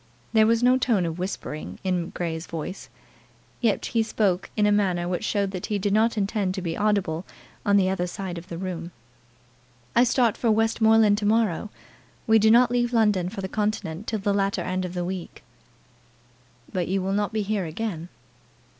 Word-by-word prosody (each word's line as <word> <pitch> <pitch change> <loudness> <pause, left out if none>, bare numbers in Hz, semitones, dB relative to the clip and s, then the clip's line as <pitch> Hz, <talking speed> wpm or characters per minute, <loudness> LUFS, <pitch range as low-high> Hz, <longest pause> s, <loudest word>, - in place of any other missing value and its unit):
There 220 -1 +5
was 230 +1 +2
no 255 +1 +5
tone 220 -8 +2
of 165 +1 -4
whispering 180 -4 -5
in 180 -3 -1
Grey's 165 -1 -4
voice, 165 +3 -6
but - - -31
yet 220 -4 +1
he 230 - +1
spoke 205 -4 0
in 210 - +3
a 210 - +4
manner 185 -4 +1
which 180 +2 -2
showed 200 -2 0
that 185 -2 -5
he 210 - 0
did 200 0 -1
not 225 +2 +2
intend 200 -2 0
to 190 - -3
be 165 -2 -2
audible 200 -6 0 0.4
on 200 0 +5
the 190 -2 +3
other 185 -1 -1
side 180 -1 -5
of 170 - -14
the 170 - -6
room. 175 -2 -5 1.1
"I 240 - +6
start 240 -2 +2
for 235 - 0
Westmoreland 220 -1 +4
to 205 - -1
morrow. 215 -2 +1 0.6
We 220 0 +5
do 220 +1 +4
not 240 +2 +5
leave 240 0 +1
London 210 -6 +2
for 195 0 -6
the 190 - -3
continent 210 -3 -3
till 220 - -1
the 200 0 0
latter 200 0 0
end 185 0 -2
of 180 0 -6
next 175 -1 -2
week." 185 -1 -6 1.3
"But 180 -2 -1
you 195 +2 0
will 195 +1 -1
not 205 +1 0
be 215 -1 -1
here 205 -2 -1
again?" 170 -1 -4
200 Hz, 195 wpm, -25 LUFS, 180-220 Hz, 1.3 s, I